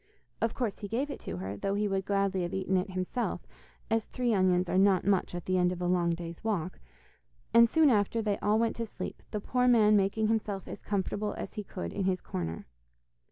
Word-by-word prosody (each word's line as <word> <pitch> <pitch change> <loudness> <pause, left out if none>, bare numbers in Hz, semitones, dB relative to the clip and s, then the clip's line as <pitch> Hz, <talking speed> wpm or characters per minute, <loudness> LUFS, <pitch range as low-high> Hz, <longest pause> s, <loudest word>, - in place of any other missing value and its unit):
Of 225 -1 0
course 235 -6 -2
he 205 - -5
gave 260 +8 -1
it - - -6
to - - -6
her, 95 +2 -4
though 195 - -2
he 210 +1 +1
would 195 -1 -1
gladly 195 -2 +1
have 175 +2 -3
eaten 190 0 0
it 185 +2 0
himself, 185 +7 -2 0.5
as 225 -1 +2
three 245 -2 -1
onions 185 -2 +3
are 185 - +2
not 195 -2 +4
much 195 -3 +1
at 175 - -5
the 185 0 +1
end 180 0 +3
of 180 - -4
a 180 - -2
long 175 -1 +2
day's 170 +1 -8
walk, 185 -5 -2 0.7
and 235 0 +7
soon 315 -1 +5
after 210 +1 +2
they 210 -2 0
all 210 +1 +2
went 230 0 +1
to 230 - -2
sleep, - - -7
the 210 - -3
poor 250 +4 +1
man 215 -3 +6
making 205 +2 +2
himself 215 -3 -1
as - - -7
comfortable 205 +1 -2
as - - -6
he 210 - -5
could 190 - -6
in 195 - -2
his 185 -1 +1
corner. 85 - -5
200 Hz, 225 wpm, -30 LUFS, 185-220 Hz, 0.7 s, and